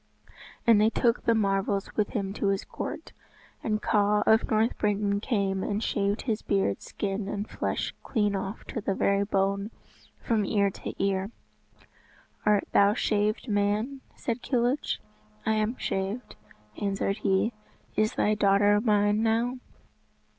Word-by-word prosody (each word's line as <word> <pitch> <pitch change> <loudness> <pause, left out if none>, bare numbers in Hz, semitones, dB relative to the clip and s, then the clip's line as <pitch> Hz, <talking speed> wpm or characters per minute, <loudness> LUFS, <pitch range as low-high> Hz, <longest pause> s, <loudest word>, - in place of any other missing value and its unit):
And 225 -3 +6
they 215 - +5
took 235 +1 +1
the 230 - +4
marvels 195 -1 0
with 210 -2 +1
them 195 -3 -2
to 205 - -1
his 195 0 0
court. - - -6 0.5
And 215 -1 -1
Kaw 210 0 +3
of 220 0 +4
North 220 +2 +2
Britain 205 -1 +1
came 200 -4 0
and 205 +3 -2
shaved 200 0 0
his 225 -4 -1
beard, 195 - 0
skin 195 0 -3
and 205 +1 -3
flesh - - -2
clean 205 -2 0
off 195 +2 -5
to 225 - -3
the 195 -1 -1
very 200 +1 +2
bone 200 0 0 0.5
from 225 -4 0
ear 200 -1 +2
to - - -7
ear. 195 0 0 1.2
"Art 210 -1 +3
thou 200 +1 +5
shaved 215 +1 0
man?" 210 +6 0
said 235 0 -3
Kilhuch. 250 +3 0 0.5
"I 220 - +2
am 215 +3 0
shaved," 195 +6 -3 0.5
answered 195 0 0
he. 195 +5 +1 0.4
"Is 215 0 +1
thy 210 - +2
daughter 205 0 +4
mine 210 -1 +3
now?" 230 +3 +1
205 Hz, 145 wpm, -28 LUFS, 200-220 Hz, 1.2 s, And